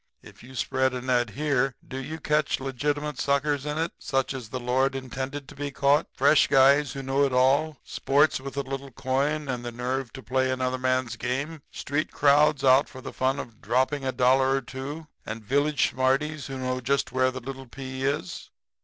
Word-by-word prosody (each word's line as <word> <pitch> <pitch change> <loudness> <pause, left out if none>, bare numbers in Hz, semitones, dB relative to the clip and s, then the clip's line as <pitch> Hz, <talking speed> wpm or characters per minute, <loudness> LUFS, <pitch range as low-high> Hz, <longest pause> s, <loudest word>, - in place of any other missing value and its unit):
If - - -15
you 130 +2 -13
spread 130 +1 0
a 125 - -3
net 125 -2 +1
here, 135 +1 0
do 130 - -6
you 155 +5 -6
catch 150 -1 +1
legitimate 145 +3 -2
suckers 140 0 0
in 150 +1 -2
it, 165 +1 -1
such 135 -2 -1
as 125 -5 -7
the 130 - -4
Lord 130 +2 +1
intended 135 +2 -5
to 145 - -12
be 145 0 -3
caught 140 +2 +2
fresh 155 - +5
guys 140 +1 +5
who 135 - -6
know 135 +2 +1
it 140 - +2
all, 135 +4 +3
sports 145 +2 +2
with 135 +1 -8
a 140 - 0
little 135 +1 -6
coin 140 +4 -1
and 125 -2 -3
the 120 - -4
nerve 125 +1 -3
to 130 - -9
play 130 0 +1
another 130 0 -1
man's 130 -2 0
game, 140 +6 -3
street 145 +3 -3
crowds 145 0 +4
out 135 +1 +5
for 130 - -10
the - - -8
fun 130 +1 0
of 115 -5 -8
dropping 130 +3 +1
a 130 - 0
dollar 130 +1 +3
or 135 - 0
two 135 +5 -7 0.2
and 110 0 -7
village 145 +3 +2
smarties 140 +4 0
who 135 - -5
know 130 0 -2
just 140 +1 0
where 130 +1 +2
the 130 0 -6
little 135 +1 -8
pea 130 +1 -6
is? 135 -9 -2
135 Hz, 200 wpm, -26 LUFS, 130-145 Hz, 0.2 s, fresh